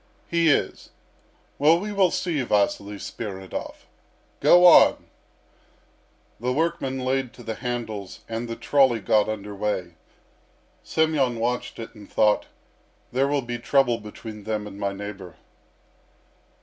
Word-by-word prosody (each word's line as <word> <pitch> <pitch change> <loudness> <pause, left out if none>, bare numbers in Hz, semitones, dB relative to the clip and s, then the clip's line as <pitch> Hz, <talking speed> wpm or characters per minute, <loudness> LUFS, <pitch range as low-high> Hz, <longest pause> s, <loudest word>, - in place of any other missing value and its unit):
"He 170 -1 +2
is." 145 - 0 0.7
"Well, 160 +4 +5
we 210 +3 -4
will 195 -3 +3
see 165 -4 -1
Vasily 105 -2 0
Spiridov. 95 -2 -7 0.5
Go 175 +1 +6
on!" 175 - +7 1.3
The 125 +3 -1
workmen 135 -3 -1
laid 130 -1 -1
to 120 - -13
the 115 - -4
handles, 110 -5 -5
and 115 +1 -4
the 115 - -4
trolley 130 -4 +3
got 105 +1 +2
under 105 -1 -5
way. 95 -4 -3 0.9
Semyon 150 -6 +1
watched 125 +2 -2
it, 115 - -8
and 105 -3 -14
thought, 105 -1 +2 0.6
"There 135 +2 +1
will 140 -1 0
be 120 0 -5
trouble 120 -2 +2
between 105 0 -9
them 110 -1 -2
and 100 -1 -9
my 100 -1 -1
neighbour." 100 -3 -8
115 Hz, 130 wpm, -24 LUFS, 105-135 Hz, 1.3 s, on